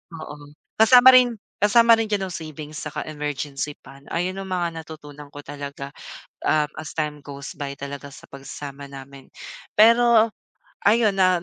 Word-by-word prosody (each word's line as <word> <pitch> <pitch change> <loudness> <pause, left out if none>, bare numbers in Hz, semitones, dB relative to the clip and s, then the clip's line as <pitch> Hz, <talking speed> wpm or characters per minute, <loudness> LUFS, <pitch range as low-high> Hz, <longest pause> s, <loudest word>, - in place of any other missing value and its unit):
Oo, 145 -2 -10 0.2
kasama 250 +3 +8
rin 250 -2 +5 0.2
kasama 230 +2 +5
rin 225 - 0
diyan 195 -3 -2
ang - - -8
savings 155 -1 -8
saka 150 - -5
emergency 145 -1 -4
fund, 135 +1 -15
ayon 185 +2 -2
yung 195 - -6
mga 175 -3 -2
natutunan 150 -2 -11
ko 145 - -8
talaga, 140 -1 -8 0.5
um, 150 -1 +2
as 155 - -8
time 150 -1 -2
goes 140 0 -9
by 140 -1 -6
talaga 140 0 -7
sa 140 - -14
pagsasama 140 0 -9
namin. 135 0 -12 0.5
Pero 230 0 +5 0.5
ayon, 215 +1 +5
na 185 -2 +3
150 Hz, 150 wpm, -23 LUFS, 140-200 Hz, 0.5 s, kasama